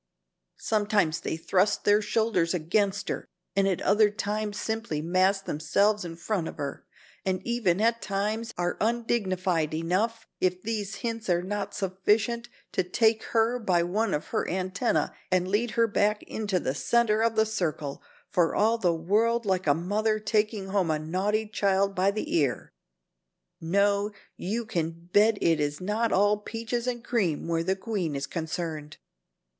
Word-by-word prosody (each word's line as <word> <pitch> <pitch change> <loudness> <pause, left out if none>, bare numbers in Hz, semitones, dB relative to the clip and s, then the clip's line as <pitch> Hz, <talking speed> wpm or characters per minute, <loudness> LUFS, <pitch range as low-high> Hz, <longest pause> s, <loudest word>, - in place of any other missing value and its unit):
Sometimes 205 -6 +1
they - - -3
thrust 185 +4 +1
their 205 +1 +4
shoulders 205 -6 +1
against 195 +4 0
her - - -3 0.3
and 195 0 +3
at 190 -3 0
other 210 +1 +4
times 210 0 -3
simply 220 -9 -2
mass 185 +4 +2
themselves 200 +7 +1
in 170 -1 -6
front 175 0 -2
of - - -8
her, 140 -1 -5 0.4
and 185 -1 0
even, 220 -7 +1
at 230 +1 +2
times, 215 +3 -2
are 175 0 -1
undignified 190 -8 0
enough, 205 +8 -1
if 180 0 +1
these 215 -2 -3
hints 225 -3 -3
are 175 0 +2
not 200 +1 -3
sufficient, 210 +5 0 0.2
to - - +1
take 220 +4 +2
her 230 +2 +1
by 180 -6 +2
one 200 +4 0
of 150 - -5
her - - -1
antennae 185 +5 0 0.3
and 185 0 +2
lead 210 +5 +1
her 230 - +5
back 210 -1 +1
into 205 -4 -2
the 130 - -1
center 220 +6 +2
of 230 0 +2
the 220 0 +4
circle, 155 -9 -3 0.3
for 170 -2 +1
all 225 +2 +3
the 175 -5 +2
world 220 +8 +1
like 190 -3 0
a 145 - +5
mother 210 +6 0
taking 210 -2 0
home 190 -3 +1
a 155 - +2
naughty 190 +8 -1
child 200 -1 +1
by 190 +1 +2
the 210 +2 -2
ear. 140 -7 0 0.9
No, 200 +4 +2 0.3
you 225 +5 -3
can 170 -3 -4
bet 210 +1 +5
it 165 -2 +3
is 145 0 -1
not 215 +5 0
all 205 +2 +4
'peaches 230 +3 -4
and 240 -2 -2
cream' 190 -12 0
where 165 -1 +1
the 190 +3 0
queen 190 -7 -3
is 140 0 -2
concerned." 160 -3 -4
200 Hz, 160 wpm, -27 LUFS, 175-220 Hz, 0.9 s, her